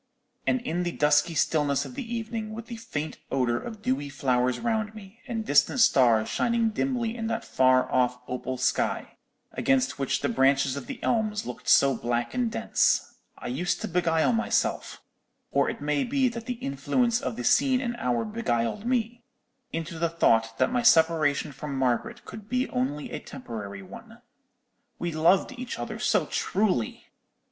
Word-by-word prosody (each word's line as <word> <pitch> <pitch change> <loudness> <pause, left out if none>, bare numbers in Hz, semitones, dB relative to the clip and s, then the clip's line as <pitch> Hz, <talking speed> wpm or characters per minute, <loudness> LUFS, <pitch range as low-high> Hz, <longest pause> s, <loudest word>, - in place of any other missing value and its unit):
And 255 - +2
in 175 -7 -2
the 175 -1 -1
dusky 150 +2 +2
stillness 145 -3 +1
of - - -9
the 250 -3 -6
evening, 220 -1 -4
with 230 0 -7
the 235 -1 -7
faint 160 -10 -5
odour 120 -3 +1
of 220 - -8
dewy 140 +3 -1
flowers 125 -2 0
round 220 -2 -1
me, 210 +1 -13
and 225 -3 -3
distant 145 - +3
stars 120 - +5
shining 235 -1 +1
dimly 240 -1 -1
in 225 -2 -3
that 225 +1 -3
far 130 0 +3
off 125 -1 +2
opal 125 0 -4
sky; 130 +1 -1 0.3
against 265 - +1
which 135 - 0
the - - +1
branches 135 0 +2
of 140 - -7
the 275 - -5
elms 215 -2 0
looked 125 - -6
so 135 -1 +6
black 120 0 -2
and 245 -2 0
dense, - - +1 0.2
I - - -11
used 170 +8 -1
to - - -2
beguile 165 +2 +2
myself—or 230 0 -2
it - - -6
may 145 -1 0
be 265 0 +1
that 235 0 -8
the 250 - -1
influence 230 - 0
of 125 - -3
the 125 - -5
scene 260 - +3
and 240 -2 -3
hour 120 - 0
beguiled 210 - -2
me—into 235 -7 -5
the 170 0 +1
thought 115 -9 +2
that - - +2
my 245 - +2
separation 160 -8 +3
from 140 0 -6
Margaret 135 - -1
could 215 0 -10
be 250 +1 0
only 140 +4 -2
a - - -4
temporary 110 - -8
one. 230 +4 -12 0.8
We 175 - -3
loved 170 - +3
each 255 -1 -5
other - - -5
so - - +2
truly! 190 - -1
175 Hz, 170 wpm, -27 LUFS, -, 0.8 s, so